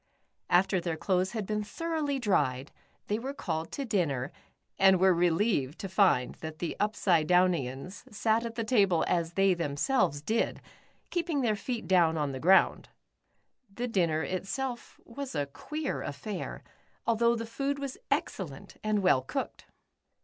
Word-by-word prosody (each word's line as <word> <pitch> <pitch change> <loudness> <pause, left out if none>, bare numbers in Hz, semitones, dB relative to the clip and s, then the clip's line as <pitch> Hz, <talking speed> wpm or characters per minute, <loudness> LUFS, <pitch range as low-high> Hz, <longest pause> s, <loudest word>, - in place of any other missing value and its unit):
After 185 +1 +3
their 170 -2 -2
clothes 185 +3 0
had 220 -3 -2
been 210 +1 -1
thoroughly 305 +4 -2
dried, 140 - 0 0.3
they 210 +2 -1
were 270 +4 -5
called 160 - -3
to 280 - -3
dinner, 155 - 0 0.5
and 190 -1 +6
were 190 0 +5
relieved 170 - +1
to 195 - -5
find 190 - +3
that 160 -1 -6
the 170 0 -3
Upsidedownians 180 - +1
sat 220 +2 +1
at 230 -1 -5
the 230 - -1
table 200 -7 +3
as 170 -1 0
they 195 0 +4
themselves 165 - 0
did, 225 +7 0 0.5
keeping 335 -5 0
their 225 -4 +2
feet 235 +2 -4
down 170 -4 +4
on 145 -2 -1
the 130 - -5
ground. 190 +5 +4 0.8
The 240 +5 -3
dinner 170 -8 +1
itself 240 +8 -4
was 265 0 -7
a 145 -1 0
queer 300 - -4
affair, 180 +8 -5 0.4
although 235 +1 +3
the 230 0 -4
food 275 +5 -2
was 275 -2 -5
excellent, - - -3
and 215 -2 +1
well 160 -8 +4
cooked. 130 - -5
195 Hz, 150 wpm, -29 LUFS, 165-230 Hz, 0.8 s, and